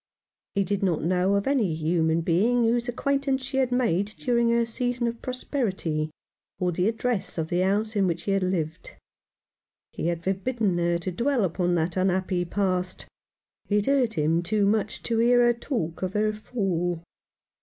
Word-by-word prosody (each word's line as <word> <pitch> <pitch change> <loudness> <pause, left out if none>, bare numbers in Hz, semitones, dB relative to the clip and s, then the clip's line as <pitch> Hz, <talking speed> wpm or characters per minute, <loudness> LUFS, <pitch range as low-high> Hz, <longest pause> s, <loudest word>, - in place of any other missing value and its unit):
He 200 - +3
did 195 +1 -2
not 180 -5 +1
know 185 +3 +2
of 200 - 0
any 235 - +1
human 160 +1 +1
being 215 +9 +2
whose 235 +2 +1
acquaintance 275 +1 0
she 265 0 -3
had 260 -2 +2
made 205 -7 +1
during 235 -2 +2
her 235 0 +3
season 245 +1 -2
of 235 0 -3
prosperity, 190 - -2 0.5
or 180 -1 0
the 180 +3 +1
address 230 -4 -2
of 160 -1 -2
the 175 - 0
house 205 +4 +1
in 195 -2 +3
which 170 -1 -1
she 200 - -2
had 195 0 +2
lived. 165 -4 -3 1.0
He - - -3
had 170 -1 -2
forbidden 195 +1 0
her 170 0 +2
to 170 +2 -4
dwell 240 +5 +1
upon 175 0 0
that 165 +2 -1
unhappy 185 -1 +1
past. 185 -1 -1 0.6
It 205 0 +2
hurt 260 -5 +2
him 160 +2 +2
too 205 +3 +1
much 210 +1 0
to 230 -1 0
hear 245 +1 +5
her 240 - +4
talk 230 - -3
of 185 0 -2
her 215 0 +1
fall. 180 -6 -2
195 Hz, 175 wpm, -26 LUFS, 175-235 Hz, 1.0 s, hear